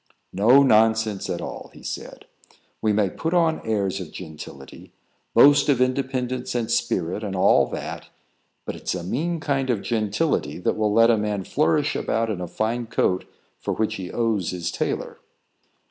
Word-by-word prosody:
"No 120 +8 +6
nonsense 110 -4 +3
at - - -2
all," - - -7
he - - -14
said. - - -7 0.6
"We 110 - +2
may 105 -1 +2
put 160 - -3
on 165 -2 +2
airs 100 -3 -1
of 85 - -8
gentility, 75 -5 -10 0.4
boast 145 0 +6
of 135 -4 +3
independence 130 -1 -1
and 115 -1 -1
spirit, 95 -3 -1
and 100 -2 -3
all 95 - +4
that; - - -6 0.6
but - - -4
it's - - -3
a 90 - -4
mean 160 - -2
kind 135 -3 -1
of 110 -5 0
gentility 115 +7 0
that 90 - 0
will 110 -1 +1
let 115 +2 +5
a 115 - +3
man 105 -2 -2
flourish 150 - +1
about 115 0 0
in 95 -4 -4
a 90 - -4
fine 115 +5 -2
coat 95 -4 0 0.3
for - - -3
which 110 -1 -1
he 90 -2 -6
owes 110 -7 0
his 85 -1 -3
tailor. - - -3
110 Hz, 170 wpm, -23 LUFS, 95-130 Hz, 0.6 s, No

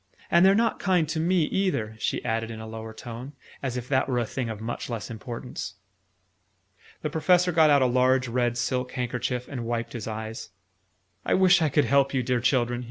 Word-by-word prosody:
And 170 - +6
they're 195 +1 +6
not 230 +1 +1
kind 180 -5 +2
to 160 - -1
me 175 +1 +2
either," 150 - -1
she - - -2
added 115 0 -1
in 110 -1 -7
a 110 - -7
lower 110 0 -7
tone, 120 +4 -8 0.3
as 130 -2 -3
if 125 0 -5
that 130 -1 +1
were 125 - 0
a 120 - +1
thing 120 +1 -4
of 110 -2 -5
much 115 +3 -5
less 115 0 -5
importance. 120 0 -6 1.3
The 155 - -2
Professor 180 +2 +3
got 160 -2 +5
out 140 -2 +5
a - - +4
large 130 +1 +3
red 120 0 0
silk 125 +1 -1
handkerchief, 125 0 -2
and 130 -4 -5
wiped 115 0 -3
his 115 -3 -5
eyes. 110 0 -6 0.7
"I - - +2
wish 185 -1 +5
I 155 - +3
could 145 0 +2
help 140 +2 +2
you, 130 - +1
dear 125 0 +1
children!" 120 -1 +1
125 Hz, 205 wpm, -26 LUFS, 115-150 Hz, 1.3 s, And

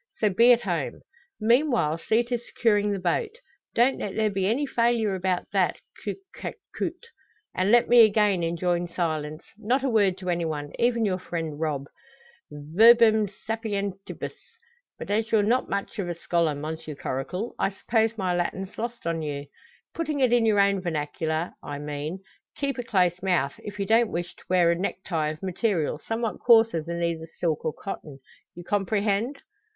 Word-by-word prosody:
So 210 -2 +2
be 235 +6 +6
at 240 -1 +5
home. 175 - -3 0.4
Meanwhile, 235 - +2
see 225 +7 +2
to 240 0 -2
securing 210 -3 +1
the 200 - -1
boat. 420 - -1 0.4
Don't 245 +3 +3
let 195 - -4
there 220 -1 +1
be 190 -1 0
any 250 +8 +1
failure 230 -5 +1
about 185 -1 -1
that, - - +2 0.3
coute - - -3 0.2
que - - -6 0.2
coute. - - -4 0.5
And 185 +3 +1
let 240 0 +5
me 240 -1 +8
again 210 -3 +3
enjoin 175 +1 0
silence 155 -3 -2 0.2
not 245 +5 +1
a 270 - +1
word 200 -5 +3
to 185 -1 -3
any 170 0 0
one, 145 -2 -3
even 235 -1 +2
your 185 -2 0
friend 165 -4 -4
Rob. 150 -4 -1 0.6
Verbum 215 +9 +5
sapientibus! 200 -2 -4 0.6
But - - -6
as 220 +2 0
you're 215 -2 +4
not 240 +5 +1
much 200 +1 -3
of 180 -3 -2
a 175 - -3
scholar, 170 -2 0
Monsieur 155 +1 -6
Coracle, 140 - -4
I - - +2
suppose 225 +3 0
my 185 -3 0
Latin's 185 +3 -3
lost 235 -2 -5
on 165 -1 -1
you. 145 -2 -4 0.5
Putting 310 -3 -2
it 255 -3 +3
in 235 -2 +4
your 210 -2 +3
own 200 -1 +3
vernacular, 160 0 -2
I 145 - -6
mean: 150 +5 -5 0.3
keep 275 -3 -2
a - - -2
close 180 -6 +1
mouth, 175 -7 +1
if 205 0 -8
you 200 - 0
don't 225 +2 +4
wish 175 +1 -4
to - - -17
wear 180 -2 +4
a - - +2
necktie 170 -3 -2
of 155 +2 -7
material 185 -5 0
somewhat 225 0 -2
coarser 225 -7 +5
than 170 +2 -4
either 165 -1 -2
silk 160 -3 -1
or 155 - 0
cotton. 155 -6 -7 0.4
You 175 - -9
comprehend?" 205 +6 0
195 Hz, 175 wpm, -26 LUFS, 165-225 Hz, 0.6 s, me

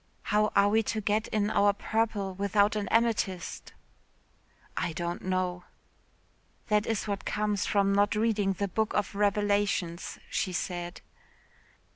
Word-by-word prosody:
"How 210 0 +2
are 200 0 +5
we 220 +2 +3
to 220 0 -2
get 215 +1 0
in 210 0 0
our 205 -1 +4
purple 210 -2 -1
without 200 +2 +2
an 210 -1 -2
amethyst?" 225 -6 0 1.0
"I 165 - -1
don't 170 +1 -3
know." 185 -1 -2 1.0
"That 210 0 +2
is 225 -1 -1
what 200 -2 -2
comes 210 -2 -1
from 200 -1 +2
not 205 +2 +3
reading 210 -3 +1
the 200 +2 -2
Book 220 +3 -1
of 205 0 0
Revelations," 200 -4 0
she 185 - -2
said. 175 +1 -4
205 Hz, 135 wpm, -29 LUFS, 190-210 Hz, 1.0 s, are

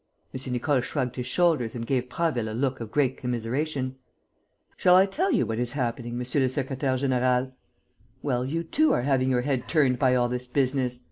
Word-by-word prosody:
M. 130 0 -5
Nicole 130 +2 +1
shrugged 125 -1 -3
his 125 -1 -4
shoulders 150 -7 +1
and 115 -1 -4
gave 125 -1 -1
Prasville 125 -8 -1
a - - -5
look 130 0 -1
of 115 -2 -6
great 135 0 +1
commiseration: 130 +3 -2 0.8
"Shall 180 - +5
I 190 +1 +7
tell 345 - 0
you - - +2
what 110 0 -3
is 120 +1 -1
happening, 120 -3 -3
monsieur 125 +3 0
le 130 - +3
secrétaire; 130 0 -1
général? 130 0 +1 0.7
Well, 125 -4 0
you 160 +6 -2
too 305 - +2
are 120 - +1
having 130 -1 +2
your 125 -1 +2
head 130 -1 -2
turned 135 -6 +2
by 130 -3 +3
all 120 -1 +2
this 125 +1 -4
business. 130 -1 0
130 Hz, 195 wpm, -26 LUFS, 125-140 Hz, 0.8 s, I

